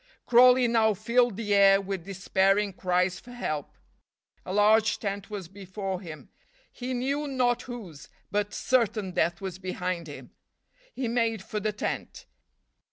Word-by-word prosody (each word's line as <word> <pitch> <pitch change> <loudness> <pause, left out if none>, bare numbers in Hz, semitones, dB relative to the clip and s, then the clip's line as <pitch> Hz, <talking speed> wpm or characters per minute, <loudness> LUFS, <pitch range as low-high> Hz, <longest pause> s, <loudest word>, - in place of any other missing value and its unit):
Crawley 250 +1 +6
now 220 -2 +3
filled 235 +1 +1
the 210 -2 -1
air 195 -1 +6
with 195 -3 -5
despairing 195 +1 +1
cries 180 0 0
for 245 - -13
help. 155 - -4 0.7
A - - -4
large 210 +2 +4
tent 200 -1 -4
was 200 -5 -6
before 195 0 -6
him; 160 -5 -10 0.4
he 255 +1 -5
knew 280 +4 -1
not 250 -3 +1
whose, 205 - -9 0.2
but 205 0 -1
certain 220 -7 0
death 175 +1 0
was 190 -1 -6
behind 185 -2 -3
him. 145 - -10 0.6
He 260 - -2
made 225 -3 0
for 210 - -4
the 215 +1 -1
tent. 210 - -5
205 Hz, 145 wpm, -27 LUFS, 190-235 Hz, 0.7 s, Crawley